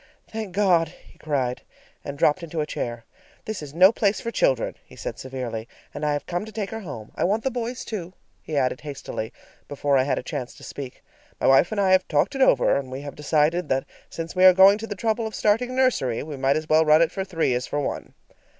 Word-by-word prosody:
"Thank 220 Hz, -3 st, -5 dB
God!" 180 Hz, -5 st, +3 dB
he 165 Hz, -, -19 dB
cried, 130 Hz, -5 st, -1 dB, 0.4 s
and 140 Hz, -, -6 dB
dropped 150 Hz, +5 st, +3 dB
into 170 Hz, -1 st, -5 dB
a 150 Hz, -, +1 dB
chair. 120 Hz, -5 st, -5 dB, 0.4 s
"This 215 Hz, -5 st, -4 dB
is 145 Hz, 0 st, -9 dB
no 185 Hz, +3 st, +7 dB
place 210 Hz, -2 st, +1 dB
for 230 Hz, -, -4 dB
children," -, -, +1 dB
he -, -, -17 dB
said -, -, -6 dB
severely, 125 Hz, -4 st, -5 dB, 0.3 s
"and 145 Hz, -, -6 dB
I 150 Hz, -1 st, +1 dB
have 145 Hz, -, -3 dB
come 175 Hz, +2 st, -2 dB
to 220 Hz, -, -9 dB
take 210 Hz, -2 st, -4 dB
her 225 Hz, -, -4 dB
home. 140 Hz, -, -8 dB
I -, -, -2 dB
want 210 Hz, +4 st, +1 dB
the 265 Hz, -, 0 dB
boys, 245 Hz, +1 st, -4 dB
too," 185 Hz, -5 st, -5 dB, 0.3 s
he 155 Hz, -, -4 dB
added 130 Hz, -2 st, 0 dB
hastily 140 Hz, -6 st, -6 dB, 0.4 s
before 140 Hz, -1 st, +1 dB
I -, -, +3 dB
had 140 Hz, -, 0 dB
a -, -, -3 dB
chance 125 Hz, 0 st, -5 dB
to -, -, -15 dB
speak. 135 Hz, -3 st, -8 dB, 0.4 s
"My -, -, -1 dB
wife 135 Hz, +8 st, +5 dB
and 215 Hz, -, -1 dB
I 195 Hz, -2 st, +3 dB
have 185 Hz, 0 st, +4 dB
talked 150 Hz, -, +1 dB
it 270 Hz, -, -3 dB
over, 260 Hz, -, +4 dB
and 140 Hz, -2 st, -2 dB
we 130 Hz, +2 st, -6 dB
have 145 Hz, -1 st, -7 dB
decided 150 Hz, +3 st, +1 dB
that 130 Hz, 0 st, +1 dB, 0.2 s
since 165 Hz, +1 st, -6 dB
we 185 Hz, -, +3 dB
are 185 Hz, 0 st, +9 dB
going 195 Hz, +3 st, +7 dB
to 225 Hz, -, -6 dB
the 205 Hz, -, -5 dB
trouble 220 Hz, +3 st, -1 dB
of 220 Hz, -, -7 dB
starting 225 Hz, +4 st, +2 dB
a -, -, -5 dB
nursery, 250 Hz, -, +1 dB
we 150 Hz, -1 st, -6 dB
might 135 Hz, +1 st, +2 dB
as 155 Hz, 0 st, -4 dB
well 160 Hz, +1 st, +5 dB
run 155 Hz, +1 st, +6 dB
it 165 Hz, -, 0 dB
for 190 Hz, -, -3 dB
three 165 Hz, -8 st, 0 dB
as 125 Hz, 0 st, -2 dB
for 145 Hz, -, -2 dB
one." 145 Hz, -, -4 dB
165 Hz, 245 wpm, -24 LUFS, 140-205 Hz, 0.4 s, are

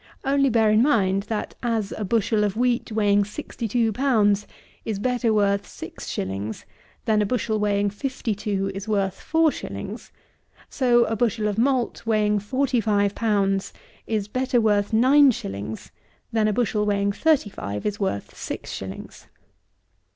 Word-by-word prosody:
Only 275 Hz, 0 st, +2 dB
bear 225 Hz, -2 st, +3 dB
in 215 Hz, +1 st, +4 dB
mind, 195 Hz, -8 st, +2 dB
that 220 Hz, -2 st, -3 dB
as 225 Hz, -4 st, -1 dB
a 215 Hz, -, -4 dB
bushel 215 Hz, +1 st, +1 dB
of 205 Hz, 0 st, -1 dB
wheat, 245 Hz, -1 st, +1 dB
weighing 205 Hz, -2 st, +3 dB
sixty 225 Hz, +2 st, -6 dB
two 225 Hz, +1 st, +1 dB
pounds, 210 Hz, -5 st, +2 dB, 0.4 s
is 215 Hz, -3 st, -3 dB
better 245 Hz, +1 st, 0 dB
worth 200 Hz, -2 st, +1 dB
six -, -, -9 dB
shillings, 100 Hz, +3 st, -4 dB, 0.4 s
than 215 Hz, -1 st, +3 dB
a -, -, +2 dB
bushel 220 Hz, -2 st, -1 dB
weighing 205 Hz, -1 st, +1 dB
fifty 255 Hz, +1 st, -3 dB
two 200 Hz, -2 st, -2 dB
is 195 Hz, +2 st, -6 dB
worth 200 Hz, -3 st, -1 dB
four 320 Hz, -1 st, +3 dB
shillings, -, -, -7 dB, 0.6 s
so 240 Hz, -3 st, +3 dB
a 225 Hz, -, -1 dB
bushel 220 Hz, -1 st, 0 dB
of 210 Hz, +1 st, -1 dB
malt 255 Hz, -1 st, +1 dB
weighing 210 Hz, -2 st, +2 dB
forty 255 Hz, +4 st, 0 dB
five 205 Hz, -2 st, +1 dB
pounds 200 Hz, -3 st, 0 dB, 0.3 s
is 215 Hz, -3 st, -1 dB
better 255 Hz, +2 st, 0 dB
worth 205 Hz, -2 st, +2 dB
nine 265 Hz, +6 st, +6 dB
shillings, 105 Hz, -, -5 dB, 0.4 s
than 220 Hz, -1 st, +2 dB
a 215 Hz, -, +1 dB
bushel 215 Hz, -2 st, 0 dB
weighing 200 Hz, -1 st, +1 dB
thirty 275 Hz, -2 st, +2 dB
five 100 Hz, -, -5 dB
is 205 Hz, -1 st, -2 dB
worth 190 Hz, -, -3 dB
six -, -, -6 dB
shillings. 95 Hz, 0 st, -8 dB
215 Hz, 160 wpm, -24 LUFS, 200-240 Hz, 0.6 s, nine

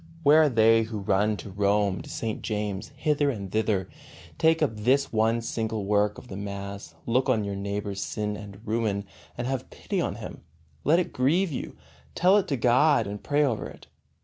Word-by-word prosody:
Where 150 Hz, +2 st, +7 dB
are 155 Hz, -, +4 dB
they 115 Hz, -2 st, +5 dB
who 110 Hz, -1 st, -4 dB
run 105 Hz, +2 st, +1 dB
to 100 Hz, -, -9 dB
Rome, 100 Hz, 0 st, +1 dB
to -, -, -11 dB
St. 110 Hz, -2 st, -3 dB
James, 105 Hz, -3 st, -3 dB
hither 145 Hz, +1 st, +1 dB
and 100 Hz, -7 st, -4 dB
thither? 105 Hz, -3 st, 0 dB, 0.5 s
Take 160 Hz, 0 st, +4 dB
up 130 Hz, -7 st, 0 dB
this 130 Hz, +6 st, +1 dB
one 115 Hz, +1 st, +2 dB
single 110 Hz, -2 st, -3 dB
work 105 Hz, +1 st, +2 dB
of -, -, -11 dB
the 95 Hz, -, -7 dB
mass, 100 Hz, -3 st, -6 dB
look 130 Hz, +3 st, +1 dB
on 115 Hz, -4 st, +2 dB
your 100 Hz, -1 st, -3 dB
neighbor's 100 Hz, 0 st, -3 dB
sin 105 Hz, -2 st, -3 dB
and 100 Hz, -1 st, -10 dB
ruin, 110 Hz, -2 st, -1 dB, 0.3 s
and 120 Hz, -, -3 dB
have 130 Hz, -1 st, -3 dB
pity -, -, -3 dB
on -, -, -2 dB
him; -, -, -8 dB, 0.4 s
let 155 Hz, +4 st, +4 dB
it 180 Hz, -, -1 dB
grieve 160 Hz, +8 st, +2 dB
you, 135 Hz, -, -5 dB, 0.4 s
tell 185 Hz, +3 st, +5 dB
it 205 Hz, -, +1 dB
to 140 Hz, -, -1 dB
God, 125 Hz, +2 st, +4 dB
and 100 Hz, +1 st, -6 dB
pray 145 Hz, +1 st, +2 dB
over 120 Hz, -6 st, -1 dB
it. -, -, -14 dB
110 Hz, 195 wpm, -26 LUFS, 100-130 Hz, 0.5 s, Where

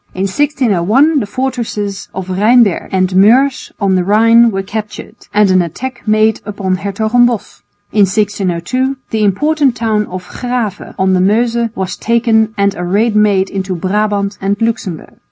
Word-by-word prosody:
In 185 Hz, -, -2 dB
1601 260 Hz, -, +1 dB
the 210 Hz, -, -3 dB
fortresses 215 Hz, -4 st, -4 dB
of 190 Hz, -1 st, -6 dB
Rheinberg 210 Hz, +2 st, +2 dB
and 185 Hz, -1 st, 0 dB
Meurs 250 Hz, +8 st, +3 dB
on 200 Hz, -2 st, +1 dB
the 185 Hz, -1 st, +1 dB
Rhine 230 Hz, +4 st, +4 dB
were 195 Hz, -2 st, -3 dB
captured, 210 Hz, +1 st, -7 dB, 0.2 s
and 210 Hz, -2 st, +3 dB
an 185 Hz, 0 st, +4 dB
attack 240 Hz, +10 st, -6 dB
made 215 Hz, 0 st, +2 dB
upon 200 Hz, -3 st, -3 dB
Hertogenbosch. 220 Hz, +4 st, 0 dB, 0.3 s
In 205 Hz, -2 st, +3 dB
1602 205 Hz, +6 st, -1 dB
the 220 Hz, -1 st, 0 dB
important 275 Hz, +6 st, +1 dB
town 220 Hz, -3 st, -1 dB
of 180 Hz, 0 st, -8 dB
Grave 245 Hz, -5 st, -4 dB
on 190 Hz, 0 st, +1 dB
the 185 Hz, -, +2 dB
Meuse 230 Hz, +4 st, +1 dB
was 190 Hz, -1 st, -4 dB
taken 225 Hz, -1 st, +1 dB
and 200 Hz, 0 st, +1 dB
a 180 Hz, -, -6 dB
raid 210 Hz, +5 st, 0 dB
made 200 Hz, -2 st, +2 dB
into 190 Hz, -1 st, -3 dB
Brabant 200 Hz, +2 st, -1 dB
and 200 Hz, +1 st, -1 dB
Luxemburg. 225 Hz, -7 st, -3 dB
210 Hz, 155 wpm, -14 LUFS, 190-235 Hz, 0.3 s, Rhine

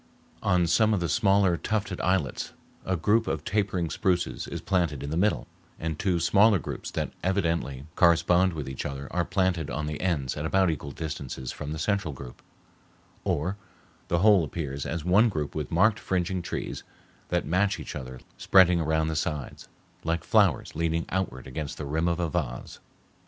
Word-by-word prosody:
On 90 Hz, -1 st, +3 dB
some 110 Hz, +6 st, +3 dB
of -, -, 0 dB
the 85 Hz, -, -1 dB
smaller 100 Hz, -4 st, +3 dB
tufted 100 Hz, -3 st, -2 dB
islets 90 Hz, -8 st, 0 dB, 0.3 s
a 95 Hz, -1 st, +1 dB
group 105 Hz, +8 st, +2 dB
of -, -, -2 dB
tapering 95 Hz, -5 st, 0 dB
spruces 90 Hz, +1 st, 0 dB
is -, -, -5 dB
planted 85 Hz, -8 st, 0 dB
in 70 Hz, -, -4 dB
the -, -, -1 dB
middle, 100 Hz, +5 st, +1 dB, 0.3 s
and 80 Hz, -1 st, -3 dB
two 90 Hz, -3 st, +1 dB
smaller 100 Hz, +6 st, +5 dB
groups 80 Hz, -, -6 dB
that -, -, -3 dB
evidently 85 Hz, -8 st, -1 dB
correspond 85 Hz, +2 st, +4 dB
with 75 Hz, -4 st, -5 dB
each 65 Hz, -1 st, -4 dB
other 70 Hz, -1 st, -5 dB
are 90 Hz, 0 st, +1 dB
planted 90 Hz, -4 st, 0 dB
on 75 Hz, 0 st, -3 dB
the 75 Hz, 0 st, -4 dB
ends 75 Hz, -9 st, 0 dB
at 75 Hz, -, -4 dB
about 95 Hz, +2 st, +3 dB
equal 70 Hz, -2 st, -5 dB
distances 70 Hz, -4 st, -5 dB
from 75 Hz, -, -6 dB
the 80 Hz, -, -3 dB
central 85 Hz, -3 st, -1 dB
group; 65 Hz, -2 st, -10 dB, 0.8 s
or 90 Hz, +7 st, -1 dB, 0.5 s
the 85 Hz, -, +1 dB
whole 105 Hz, -5 st, +6 dB
appears 70 Hz, -3 st, -4 dB
as 85 Hz, -2 st, -3 dB
one 100 Hz, +6 st, +5 dB
group 75 Hz, -7 st, -3 dB
with 75 Hz, -1 st, -3 dB
marked 105 Hz, +6 st, +3 dB
fringing 90 Hz, 0 st, -1 dB
trees -, -, -4 dB, 0.5 s
that -, -, 0 dB
match 95 Hz, +6 st, +1 dB
each -, -, -7 dB
other 65 Hz, -1 st, -7 dB, 0.2 s
spreading 90 Hz, -3 st, +5 dB
around 80 Hz, 0 st, +1 dB
the 80 Hz, -, -2 dB
sides, 75 Hz, -3 st, -3 dB, 0.4 s
like 85 Hz, +1 st, -1 dB
flowers -, -, +3 dB
leaning 85 Hz, +1 st, 0 dB
outward 85 Hz, -10 st, -2 dB
against 70 Hz, +3 st, -5 dB
the 75 Hz, -, -5 dB
rim 80 Hz, +4 st, 0 dB
of 85 Hz, 0 st, 0 dB
a 85 Hz, -, +1 dB
vase. 70 Hz, -7 st, -4 dB
85 Hz, 180 wpm, -27 LUFS, 75-95 Hz, 0.8 s, whole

